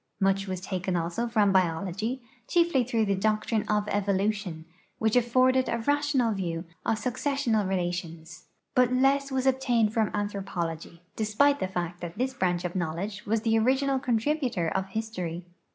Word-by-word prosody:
Much 195 Hz, 0 st, +1 dB
was 185 Hz, -1 st, -3 dB
taken 185 Hz, 0 st, -3 dB
also 175 Hz, +8 st, -1 dB
from 215 Hz, -4 st, +3 dB
biology, 190 Hz, +7 st, 0 dB, 0.2 s
chiefly 340 Hz, -7 st, +3 dB
through 230 Hz, -2 st, 0 dB
the 200 Hz, -, +1 dB
doctrine 215 Hz, +2 st, +1 dB
of 210 Hz, 0 st, +1 dB
evolution, 200 Hz, -4 st, -1 dB, 0.3 s
which 220 Hz, 0 st, +1 dB
afforded 255 Hz, +2 st, +3 dB
a 235 Hz, -, 0 dB
rational 285 Hz, -1 st, +1 dB
view 170 Hz, -3 st, -3 dB, 0.2 s
of 220 Hz, -, +1 dB
successional 245 Hz, -4 st, 0 dB
relations; 175 Hz, -2 st, -4 dB, 0.3 s
but 250 Hz, -1 st, +4 dB
less 275 Hz, +2 st, +2 dB
was 260 Hz, 0 st, 0 dB
obtained 245 Hz, -5 st, +2 dB
from 220 Hz, -2 st, +2 dB
anthropology, 180 Hz, -5 st, -4 dB
despite 280 Hz, +7 st, +2 dB
the 190 Hz, -, -1 dB
fact 175 Hz, -2 st, -4 dB
that 170 Hz, -1 st, -6 dB
this 260 Hz, +1 st, -1 dB
branch 180 Hz, -6 st, 0 dB
of 175 Hz, -, -4 dB
knowledge 185 Hz, +5 st, -3 dB
was 220 Hz, +1 st, +1 dB
the 225 Hz, 0 st, +2 dB
original 265 Hz, +3 st, +2 dB
contributor 245 Hz, -, 0 dB
of 190 Hz, +3 st, -2 dB
history. 185 Hz, -5 st, -4 dB
210 Hz, 150 wpm, -27 LUFS, 185-250 Hz, 0.3 s, but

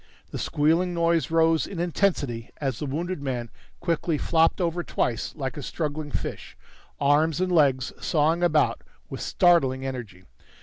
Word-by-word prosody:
The -, -, -5 dB
squealing 165 Hz, +4 st, +1 dB
noise 170 Hz, -3 st, +1 dB
rose 165 Hz, 0 st, +3 dB
in 190 Hz, -, -6 dB
intensity 165 Hz, -, 0 dB
as 135 Hz, -3 st, -3 dB
the 150 Hz, -, -3 dB
wounded 170 Hz, +4 st, -3 dB
man 125 Hz, -4 st, -3 dB, 0.3 s
quickly 170 Hz, -2 st, 0 dB
flopped 165 Hz, +2 st, +2 dB
over 175 Hz, -1 st, -1 dB
twice 120 Hz, -8 st, -2 dB
like 135 Hz, -3 st, -4 dB
a -, -, -4 dB
struggling 150 Hz, +1 st, -4 dB
fish, -, -, -5 dB, 0.4 s
arms 145 Hz, +2 st, +3 dB
and 185 Hz, 0 st, 0 dB
legs 135 Hz, -6 st, +3 dB
sawing 160 Hz, +2 st, +1 dB
about 155 Hz, -3 st, +2 dB, 0.3 s
with -, -, -5 dB
startling 135 Hz, -7 st, +3 dB
energy. 115 Hz, -9 st, -6 dB
155 Hz, 145 wpm, -25 LUFS, 135-170 Hz, 0.4 s, rose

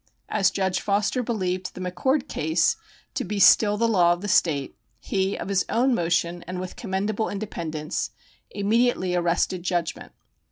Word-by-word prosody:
As 195 Hz, -, +3 dB
Judge 190 Hz, -2 st, -1 dB
Foster 205 Hz, +5 st, 0 dB
believed 185 Hz, -6 st, -2 dB
the -, -, -8 dB
McCord 220 Hz, +10 st, 0 dB
case 160 Hz, +3 st, +1 dB, 0.4 s
to -, -, -2 dB
be 205 Hz, +2 st, -4 dB
still 205 Hz, +1 st, +6 dB
the 230 Hz, +2 st, +2 dB
law 175 Hz, -6 st, +4 dB
of 175 Hz, -, -6 dB
the 205 Hz, -, -4 dB
State, 150 Hz, -7 st, +1 dB, 0.2 s
he, 195 Hz, +5 st, -1 dB
of -, -, -5 dB
his 195 Hz, -1 st, +1 dB
own 255 Hz, +3 st, +2 dB
motion, 170 Hz, -2 st, 0 dB
and 180 Hz, 0 st, -4 dB
with 185 Hz, 0 st, -6 dB
commendable 205 Hz, 0 st, -2 dB
independence, 165 Hz, -7 st, -4 dB, 0.4 s
immediately 210 Hz, -2 st, +1 dB
arrested 175 Hz, +1 st, 0 dB
judgment. 175 Hz, -1 st, -2 dB
190 Hz, 155 wpm, -25 LUFS, 175-210 Hz, 0.4 s, still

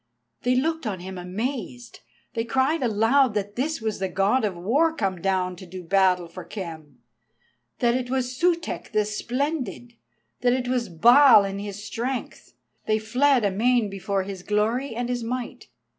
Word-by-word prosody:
They 250 Hz, +1 st, +2 dB
looked 320 Hz, +1 st, 0 dB
on 195 Hz, -4 st, -3 dB
him 185 Hz, 0 st, -7 dB
amazed, 235 Hz, +5 st, -5 dB, 0.3 s
they 230 Hz, -, -1 dB
cried 265 Hz, +6 st, +1 dB
aloud 235 Hz, +2 st, +3 dB
that 205 Hz, 0 st, -2 dB
this 295 Hz, +2 st, -2 dB
was 220 Hz, -2 st, -2 dB
the 190 Hz, 0 st, -1 dB
God 195 Hz, +7 st, +2 dB
of 200 Hz, -4 st, -1 dB
War 285 Hz, -, +2 dB
come 190 Hz, -, -2 dB
down 185 Hz, -1 st, 0 dB
to 185 Hz, -, -11 dB
do 185 Hz, +1 st, -8 dB
battle 180 Hz, -1 st, +2 dB
for 175 Hz, +2 st, -9 dB
Khem, 160 Hz, -, -9 dB, 0.7 s
that 235 Hz, -1 st, +2 dB
it 250 Hz, 0 st, -2 dB
was 255 Hz, -1 st, -1 dB
Sutek 335 Hz, -4 st, -1 dB
the 215 Hz, -1 st, +2 dB
Splendid, 245 Hz, +2 st, -3 dB, 0.5 s
that 245 Hz, -1 st, +3 dB
it 255 Hz, -1 st, -1 dB
was 245 Hz, -3 st, -1 dB
Baal 235 Hz, -, +7 dB
in 195 Hz, 0 st, -4 dB
his 205 Hz, 0 st, -6 dB
strength; 245 Hz, +4 st, -5 dB, 0.3 s
they 215 Hz, 0 st, +3 dB
fled 245 Hz, +3 st, +2 dB
amain 220 Hz, +2 st, +2 dB
before 195 Hz, 0 st, -2 dB
his 190 Hz, -1 st, -7 dB
glory 220 Hz, +6 st, 0 dB
and 240 Hz, +1 st, -2 dB
his 245 Hz, -1 st, -2 dB
might. 245 Hz, +1 st, -5 dB
225 Hz, 165 wpm, -25 LUFS, 195-255 Hz, 0.7 s, Baal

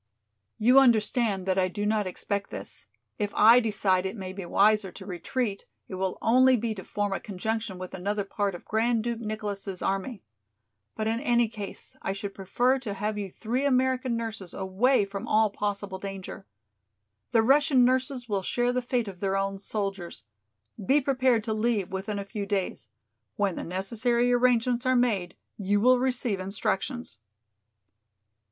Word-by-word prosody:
"You 250 Hz, +5 st, +6 dB
understand 220 Hz, -5 st, +2 dB
that 190 Hz, 0 st, +1 dB
I 185 Hz, -, +3 dB
do 205 Hz, +3 st, -4 dB
not 210 Hz, -2 st, +1 dB
expect 200 Hz, +2 st, -3 dB
this. -, -, -7 dB, 0.3 s
If 205 Hz, -1 st, -1 dB
I 230 Hz, +3 st, +8 dB
decide 200 Hz, -5 st, +1 dB
it 190 Hz, -, -6 dB
may 185 Hz, -2 st, -6 dB
be 195 Hz, 0 st, -6 dB
wiser 205 Hz, 0 st, +3 dB
to 190 Hz, -, -11 dB
retreat, 200 Hz, +4 st, -3 dB, 0.2 s
it -, -, -9 dB
will 185 Hz, 0 st, -2 dB
only 255 Hz, +2 st, +5 dB
be 225 Hz, 0 st, -2 dB
to 190 Hz, -3 st, -8 dB
form 205 Hz, -1 st, -2 dB
a -, -, -2 dB
conjunction 215 Hz, 0 st, -3 dB
with 185 Hz, 0 st, -8 dB
another 200 Hz, +3 st, -2 dB
part 200 Hz, -1 st, -2 dB
of -, -, -11 dB
Grand 225 Hz, +1 st, +1 dB
Duke 235 Hz, -1 st, -2 dB
Nicholas' 210 Hz, -4 st, -4 dB
army. 195 Hz, +4 st, -2 dB, 0.7 s
But 215 Hz, -, -2 dB
in 225 Hz, +1 st, 0 dB
any 240 Hz, -3 st, +2 dB
case 210 Hz, -2 st, -6 dB
I 195 Hz, -, -2 dB
should 200 Hz, 0 st, -6 dB
prefer 245 Hz, +7 st, +1 dB
to 215 Hz, -6 st, -5 dB
have 210 Hz, +1 st, -2 dB
you 200 Hz, -2 st, -4 dB
three 235 Hz, +8 st, -2 dB
American 255 Hz, -2 st, +1 dB
nurses 220 Hz, -5 st, -5 dB
away 200 Hz, +5 st, +2 dB
from 200 Hz, 0 st, -6 dB
all 215 Hz, -1 st, +3 dB
possible 200 Hz, -2 st, -3 dB
danger. 195 Hz, -, -7 dB, 0.8 s
The 225 Hz, -, +3 dB
Russian 270 Hz, 0 st, +5 dB
nurses 255 Hz, 0 st, 0 dB
will 200 Hz, -3 st, -1 dB
share 245 Hz, +6 st, 0 dB
the 250 Hz, -, 0 dB
fate 245 Hz, -2 st, -1 dB
of 190 Hz, -3 st, -8 dB
their 195 Hz, 0 st, 0 dB
own 195 Hz, 0 st, -2 dB
soldiers. 195 Hz, -, -4 dB, 0.6 s
Be 270 Hz, +9 st, +4 dB
prepared 260 Hz, -4 st, +2 dB
to 220 Hz, -1 st, -2 dB
leave 215 Hz, -4 st, 0 dB
within 195 Hz, +2 st, -3 dB
a 200 Hz, -, -4 dB
few 200 Hz, 0 st, -5 dB
days. 195 Hz, -2 st, -2 dB, 0.5 s
When 200 Hz, -2 st, +1 dB
the -, -, -5 dB
necessary 235 Hz, +7 st, 0 dB
arrangements 245 Hz, 0 st, +2 dB
are 255 Hz, -, +4 dB
made 210 Hz, -8 st, +1 dB, 0.2 s
you 205 Hz, +1 st, +1 dB
will 250 Hz, +3 st, +5 dB
receive 245 Hz, -5 st, 0 dB
instructions." 195 Hz, -, -3 dB
210 Hz, 170 wpm, -27 LUFS, 195-240 Hz, 0.8 s, I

